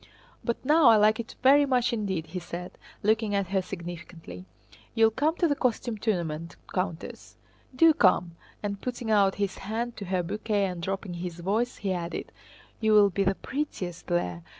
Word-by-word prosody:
But 235 - -1
now 305 0 +5
I 230 - +8
like 215 +1 +4
it 230 - -6
very 285 +2 +6
much 250 -3 +2
indeed," 195 -7 -2
he 180 - -5
said, 175 +1 -7 0.3
looking 215 0 +2
at 200 -3 -1
her 190 -1 +1
significantly. 170 - -8 0.5
"You'll 225 -1 +5
come 295 +8 +1
to 345 - +2
the 290 - +2
costume 240 -4 -1
tournament, 170 -6 -2 0.2
Countess? 180 -3 -4 0.4
Do 325 +4 +6
come!" 180 - +3 0.3
and 200 -1 -3
putting 245 -2 -3
out 200 -2 +4
his 200 -2 -2
hand 230 +3 -3
to 200 - -6
her 185 -1 0
bouquet 205 +2 -1
and 180 -2 -4
dropping 195 +1 -3
his 175 0 -6
voice, 220 +7 0
he 195 -3 -2
added, 175 -1 -4 0.5
"You 220 -1 +2
will 205 -1 +6
be 195 +3 0
the 195 0 +1
prettiest 190 - -5
there. 90 - -1
200 Hz, 175 wpm, -27 LUFS, 180-230 Hz, 0.5 s, I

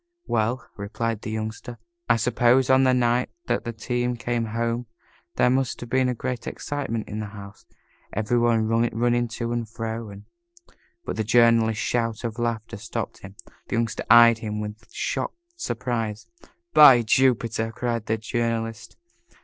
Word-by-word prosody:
"Well," 115 +3 -1
replied 110 +2 -3
the - - -6
Youngster, 110 +2 -5 0.3
"I 120 - +6
suppose 125 +3 +3
on 130 0 +5
the 130 - +4
night 120 0 +1 0.2
that - - -1
the 120 - -2
team 120 +2 -2
came 120 -1 -1
home 115 +2 -2 0.5
there 125 - +3
must 130 -1 0
have 120 - -8
been 130 -1 +2
great 125 +1 -4
excitement 135 -6 -4
in 105 - -5
the 105 - -4
house 100 0 -12 0.4
every 110 +3 0
one 115 -2 +2
running 120 +1 +1
to 115 +1 -4
and 120 -2 -3
fro 115 0 -5
and 100 0 -11 0.4
" 345 - -33
But - - -4
the 110 - 0
Journalist's 115 -1 +3
shout 115 -2 -1
of 115 0 -4
laughter 115 -1 -3
stopped - - -5
him. 100 0 -12 0.3
The - - -2
Youngster 115 -1 -1
eyed 115 0 +8
him 105 -1 -4
with 105 0 -7
shocked - - -3 0.2
surprise. 115 - -3 0.5
"By 135 -6 +8
Jupiter!" 115 -2 +2
cried 115 -1 -3
the 110 - +1
Journalist. 115 0 -3
115 Hz, 155 wpm, -24 LUFS, 110-120 Hz, 0.5 s, eyed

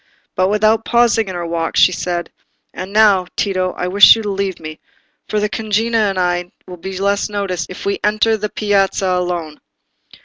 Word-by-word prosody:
But 185 +1 +1
without 215 +2 +2
pausing 235 -3 +2
in 185 - -6
her 175 -1 -4
walk, 165 -1 -3
she - - +5
said— 175 -1 -4 0.4
"And 185 +2 -7
now, 205 -4 +4
Tito, 185 -2 -1
I 180 - -4
wish 200 +4 +7
you 225 - -5
to 205 - -3
leave 195 -1 -3
me, 155 -1 -9 0.5
for 215 - 0
the 210 - 0
cugina 220 0 0
and 195 - -4
I 175 -1 -1 0.2
shall 180 - -9
be 190 +2 -7
less 200 +2 0
noticed 195 -6 -3
if 180 - -9
we 200 0 -1
enter 215 +2 +2
the 210 0 -4
piazza 195 -2 0
alone." 175 -4 -3
195 Hz, 190 wpm, -17 LUFS, 180-210 Hz, 0.5 s, wish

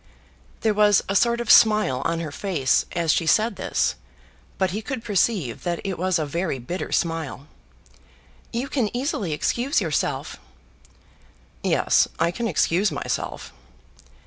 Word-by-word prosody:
There 220 -1 +2
was 210 -1 +4
a 195 - -2
sort 235 +4 +3
of 235 - +1
smile 210 - +5
on 165 0 0
her 155 -3 -5
face 150 -6 0
as 165 -2 +1
she 165 - 0
said 220 +7 +3
this, - - 0 0.6
but 190 -2 +1
he 210 +4 -3
could 250 0 -5
perceive 195 - 0
that 175 -1 -2
it 195 -3 -4
was 185 0 +1
a 155 - -1
very 165 0 -2
bitter 130 +10 -5
smile. 165 -5 -2 1.1
"You 245 +3 -2
can 250 -7 0
easily 245 - -2
excuse 245 - 0
yourself." - - -2 1.2
"Yes, - - +3
I 170 - +1
can 235 +6 -3
excuse 185 +2 +1
myself." - - -4
190 Hz, 145 wpm, -23 LUFS, 165-220 Hz, 1.2 s, smile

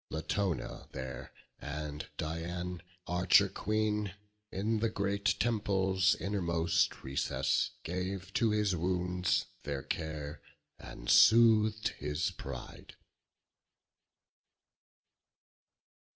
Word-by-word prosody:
Latona 90 +3 -2
there, 65 -2 -6 0.3
and 75 0 -5
Dian, 85 +3 -4 0.2
Archer 90 0 +4
Queen, 105 -2 -1 0.4
In 110 +3 0
the 115 +1 +1
great 100 -1 0
temple's 95 -4 +2
innermost 85 -4 0
recess, 70 0 0
Gave 95 +2 -4
to 115 -1 +3
his 105 -3 +1
wounds 90 +1 0 0.2
their 70 -2 -4
care, 75 -2 -4 0.4
and - - -10
sooth'd 110 - +6
his 75 +6 -1
pride. 85 - -9
90 Hz, 80 wpm, -32 LUFS, 80-105 Hz, 0.4 s, sooth'd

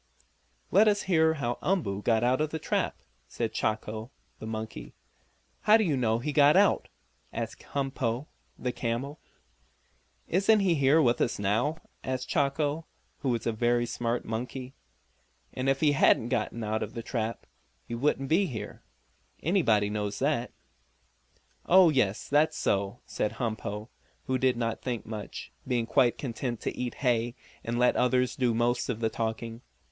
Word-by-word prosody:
"Let 210 +3 +6
us 205 -1 +3
hear 160 -4 +3
how 120 -5 -2
Umboo 155 - 0
got 115 +1 +2
out 125 +3 +2
of 155 - +1
the 160 - -3
trap," - - -2 0.2
said - - -3
Chako, 110 +1 -2 0.3
the 110 - -7
monkey. 110 - -6 0.7
"How 215 +1 +6
do 220 - +2
you 160 -8 +1
know 115 -4 +1
he 145 +5 -3
got 145 +3 +6
out?" 200 0 +4 0.4
asked - - -5
Humpo, 135 -2 -1 0.3
the 125 - -2
camel. 125 +5 -3 1.1
"Isn't 200 +4 +4
he 190 -3 +3
here 140 +1 +4
with 120 -2 +2
us 120 - +1
now?" 110 +10 0 0.3
asked 130 0 -3
Chako, 145 +1 0 0.3
who 135 - -1
was 115 -2 -1
a 115 - +2
very 120 +2 +1
smart 120 0 -2
monkey. 125 +3 -5 0.8
"And 130 +1 -1
if 135 0 +1
he 150 -2 +5
hadn't 120 -4 +4
got 120 -4 0
out 110 -1 -2
of 105 - -5
the 115 - -4
trap 115 -1 -3 0.4
he - - -6
wouldn't 135 +2 0
be 185 +7 +3
here. 115 -8 -6 0.6
Anybody 115 - +2
knows 105 -1 -2
that!" 135 -3 0 1.2
"Oh, 185 -1 +7
yes; 120 -9 +1
that's 150 +2 +3
so," 100 +4 0
said 105 - -2
Humpo, 110 -2 -4 0.4
who 130 0 0
did 130 -1 +2
not 115 -1 -2
think 120 -3 -3
much, 110 -2 -7 0.2
being 120 -3 +1
quite 120 0 +3
content 120 -2 -3
to - - -3
eat 125 -1 -3
hay, 120 0 +1 0.3
and 120 +1 -2
let 125 0 +4
others 125 0 +2
do 125 -3 +1
most 120 +1 +1
of 115 -3 -2
the 110 -1 +1
talking. 115 +1 -3
125 Hz, 160 wpm, -28 LUFS, 115-145 Hz, 1.2 s, Oh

